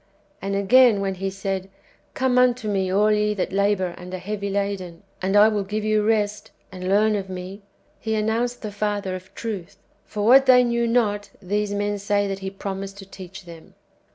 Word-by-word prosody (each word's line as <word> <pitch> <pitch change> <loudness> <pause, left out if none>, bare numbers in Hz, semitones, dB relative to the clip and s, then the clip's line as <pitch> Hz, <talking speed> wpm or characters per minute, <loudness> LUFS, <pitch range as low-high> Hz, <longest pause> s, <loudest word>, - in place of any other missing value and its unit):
And 195 0 -2
again, 220 +2 +5
when 195 -1 -1
He 195 +1 -3
said, 195 0 -4 0.2
" - - -35
Come 255 -1 +2
unto 250 -3 +2
me 195 -2 0
all 205 +3 +3
ye 210 0 +1
that 190 - -2
labour 200 -2 +1
and 180 0 -9
are - - -4
heavy 200 +2 -4
laden, 195 -4 -3 0.2
and 190 +2 0
I 210 +1 +8
will 210 -2 0
give 210 +2 -3
you 215 0 +2
rest, 210 -1 0 0.2
and 185 0 -5
learn 210 +2 +3
of 195 -2 -4
me," 185 +2 -7 0.2
* - - -39
He 220 -1 -2
announced 230 +3 -1
the 215 - -4
Father 205 -2 -2
of 185 +1 -9
truth. 205 -7 -6 0.3
For 210 -1 -4
what 265 +3 +7
they 250 -1 +7
knew 235 -1 0
not, 210 -4 +1
these 205 +2 -2
men 205 0 -1
say 205 0 +1
that 195 0 -4
He 190 0 -4
promised 195 0 -6
to 195 - -10
teach 190 0 -11
them. 165 -2 -13
205 Hz, 205 wpm, -23 LUFS, 195-215 Hz, 0.3 s, I